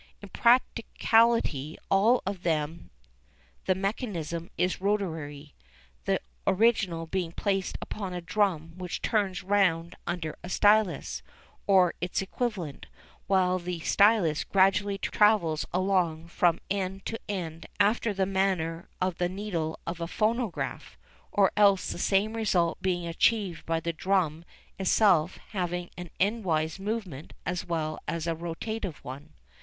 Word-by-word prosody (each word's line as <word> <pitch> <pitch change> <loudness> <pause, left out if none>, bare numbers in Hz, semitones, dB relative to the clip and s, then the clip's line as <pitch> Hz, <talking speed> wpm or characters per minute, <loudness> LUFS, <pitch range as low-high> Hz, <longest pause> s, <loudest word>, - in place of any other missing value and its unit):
In 205 - -11
practically 230 - +2
all 215 +6 +4
of 195 -1 -3
them 155 - -2 0.8
the 185 - +2
mechanism 185 - -3
is 180 0 0
rotatory, 160 -8 -2 0.5
the - - +1 0.3
original 190 -5 +2
being 175 0 -2
placed 195 -1 -1
upon 200 -3 -5
a 180 - -3
drum 175 -3 0
which 180 -2 -5
turns 195 -4 0
round 180 -4 +2
under 170 -3 -3
a 180 - -7
stylus, 185 - +2 0.5
or 185 -3 +5
its 175 0 -1
equivalent, 195 - -3 0.4
while 185 -1 +3
the 175 -1 -4
stylus 200 -6 +3
gradually 195 +1 +2
travels 195 -6 +2
along 175 -3 0
from 170 -1 +2
end 195 -1 -2
to 225 - -4
end 165 -5 -4
after 210 +2 +3
the 195 -1 0
manner 185 -4 -1
of 185 -2 -1
the 175 0 +1
needle 180 -5 -3
of 170 0 -5
a 170 - -2
phonograph, 225 +1 -2 0.3
or 200 -2 +4
else 200 -2 +4
the - - -6
same 200 +4 +2
result 180 -7 +1
being 175 -2 0
achieved 180 +1 +1
by 165 0 +1
the 170 +1 -3
drum 170 -2 0 0.3
itself 185 -3 +3
having 180 -3 -3
an 180 -1 -8
endwise 185 -6 0
movement 195 -8 -4
as 180 -1 -2
well 155 -2 -2
as 165 -1 -2
a 165 - 0
rotative 175 +3 -4
one. 140 +5 -9
185 Hz, 130 wpm, -28 LUFS, 165-200 Hz, 0.8 s, or